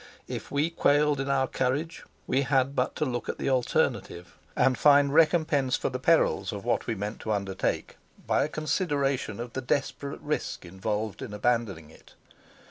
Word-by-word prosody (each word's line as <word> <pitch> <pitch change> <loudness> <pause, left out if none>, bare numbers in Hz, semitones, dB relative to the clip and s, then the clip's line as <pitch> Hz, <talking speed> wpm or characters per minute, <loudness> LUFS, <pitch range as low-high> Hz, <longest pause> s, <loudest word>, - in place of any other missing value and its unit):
If - - -6
we 145 +4 0
quailed 145 -2 +3
in 135 0 -2
our 135 -1 +2
courage: 145 +7 -2 0.2
we 130 +2 +1
had 135 0 +1
but 125 - 0
to - - 0
look 120 -3 -3
at - - -3
the 135 - -1
alternative, 115 -8 -1 0.2
and 130 - +3
find 140 +1 +5
recompense 155 -5 +3
for - - -1
the 130 - -4
perils 165 0 +2
of 100 0 -7
what 120 - 0
we 115 - -1
meant 105 +2 -5
to 110 - -4
undertake 100 -2 -2 0.3
by - - +2
a 145 - -2
consideration 145 - -1
of 120 0 -6
the 130 - -3
desperate 140 +2 -2
risk 150 -10 -3
involved 105 +4 -3
in 105 - -6
abandoning 105 -8 -1
it. - - -19
130 Hz, 175 wpm, -27 LUFS, 110-145 Hz, 0.3 s, find